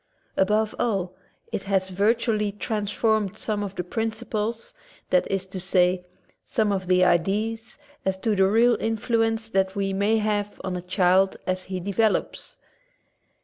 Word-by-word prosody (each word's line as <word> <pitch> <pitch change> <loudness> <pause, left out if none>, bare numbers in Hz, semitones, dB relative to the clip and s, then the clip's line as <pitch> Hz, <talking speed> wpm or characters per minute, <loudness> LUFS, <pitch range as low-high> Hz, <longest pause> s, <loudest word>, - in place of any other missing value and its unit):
Above 210 +2 +2
all, 190 -6 0 0.4
it - - -2
has 195 -1 0
vitally 210 +1 +1
transformed 210 0 -1
some 210 -2 -1
of 200 -1 -5
the 180 - -2
principles, 225 +2 -3 0.4
that 180 - +3
is 195 -1 -1
to 190 0 -7
say, 180 0 +2 0.4
some 215 -2 0
of 190 -2 -2
the 185 0 +4
ideas 210 +6 0 0.3
as 190 0 0
to 215 +2 0
the 190 -1 +4
real 235 +3 +4
influence 225 0 0
that 190 -1 +1
we 195 -1 -1
may 205 +3 +2
have 210 -1 -1
on 185 -1 -3
a 180 - -3
child 185 +1 +2
as 185 0 -2
he 185 -1 -4
.develops. 205 +4 -1
200 Hz, 145 wpm, -25 LUFS, 190-220 Hz, 0.4 s, the